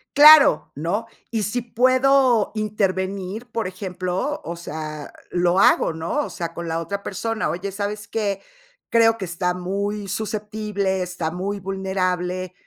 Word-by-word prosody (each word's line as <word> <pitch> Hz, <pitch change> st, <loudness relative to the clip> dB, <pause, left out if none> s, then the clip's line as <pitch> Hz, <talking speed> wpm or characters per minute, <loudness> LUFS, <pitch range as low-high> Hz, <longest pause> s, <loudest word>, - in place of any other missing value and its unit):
Claro, 295 Hz, 0 st, +8 dB
¿no? 170 Hz, +10 st, -2 dB, 0.2 s
Y 225 Hz, -2 st, -1 dB
si 245 Hz, +5 st, -1 dB
puedo 255 Hz, 0 st, +3 dB
intervenir, 200 Hz, 0 st, -2 dB
por 230 Hz, -1 st, -2 dB
ejemplo, 185 Hz, -, -3 dB
o 170 Hz, +1 st, -5 dB
sea, 155 Hz, -3 st, -6 dB, 0.2 s
lo 175 Hz, 0 st, +1 dB
hago, 190 Hz, -, +4 dB
¿no? 165 Hz, -, -2 dB
O -, -, -7 dB
sea, 170 Hz, -2 st, -5 dB
con 170 Hz, 0 st, -6 dB
la 165 Hz, 0 st, -1 dB
otra 200 Hz, +4 st, -4 dB
persona: 225 Hz, +3 st, -2 dB
"Oye, 190 Hz, +3 st, -3 dB
¿sabes 205 Hz, +1 st, -4 dB
qué? 200 Hz, -3 st, -1 dB, 0.5 s
creo 225 Hz, -1 st, +4 dB
que 210 Hz, -, -5 dB
está 180 Hz, 0 st, -1 dB
muy 200 Hz, +3 st, -3 dB
susceptible, 210 Hz, -2 st, -2 dB
está 180 Hz, -3 st, -3 dB
muy 195 Hz, +3 st, -3 dB
vulnerable, 185 Hz, -1 st, -2 dB
195 Hz, 140 wpm, -22 LUFS, 180-220 Hz, 0.5 s, Claro